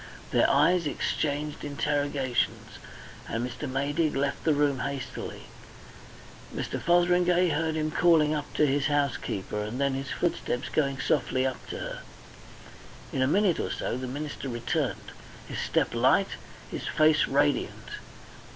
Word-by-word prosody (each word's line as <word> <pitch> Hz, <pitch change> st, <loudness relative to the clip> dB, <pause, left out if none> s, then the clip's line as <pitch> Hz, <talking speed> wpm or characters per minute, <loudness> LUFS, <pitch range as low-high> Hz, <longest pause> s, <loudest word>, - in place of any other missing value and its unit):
Their -, -, +4 dB
eyes 165 Hz, +4 st, +4 dB
exchanged 145 Hz, +1 st, -2 dB
interrogations, 145 Hz, -3 st, -1 dB, 0.5 s
and 115 Hz, +2 st, -1 dB
Mr. 135 Hz, +3 st, -6 dB
Maydig 145 Hz, +4 st, 0 dB
left 140 Hz, +1 st, -1 dB
the 155 Hz, -2 st, +4 dB
room 145 Hz, -2 st, +2 dB
hastily. 140 Hz, -1 st, -5 dB, 1.1 s
Mr. -, -, -4 dB
Fotheringay 175 Hz, +1 st, +3 dB
heard 160 Hz, +1 st, 0 dB
him 155 Hz, 0 st, -1 dB
calling 160 Hz, -2 st, +4 dB
up 150 Hz, -1 st, -3 dB
to 150 Hz, -, +4 dB
his 140 Hz, 0 st, +1 dB
housekeeper 140 Hz, -8 st, -1 dB
and 105 Hz, +5 st, -4 dB
then 140 Hz, -1 st, +2 dB
his 135 Hz, 0 st, -4 dB
footsteps 135 Hz, -7 st, -1 dB
going 140 Hz, -3 st, 0 dB
softly 130 Hz, 0 st, +1 dB
up 130 Hz, -1 st, -3 dB
to -, -, -5 dB
her. -, -, -6 dB, 1.1 s
In 130 Hz, -, 0 dB
a 130 Hz, -, +4 dB
minute 190 Hz, +3 st, +3 dB
or -, -, -1 dB
so -, -, -2 dB
the 130 Hz, +1 st, -4 dB
minister 145 Hz, +1 st, -5 dB
returned, 120 Hz, -1 st, -2 dB, 0.4 s
his -, -, -5 dB
step -, -, 0 dB
light, -, -, +3 dB, 0.4 s
his -, -, -5 dB
face 155 Hz, 0 st, +4 dB
radiant. 145 Hz, +1 st, 0 dB
145 Hz, 140 wpm, -28 LUFS, 135-155 Hz, 1.1 s, Their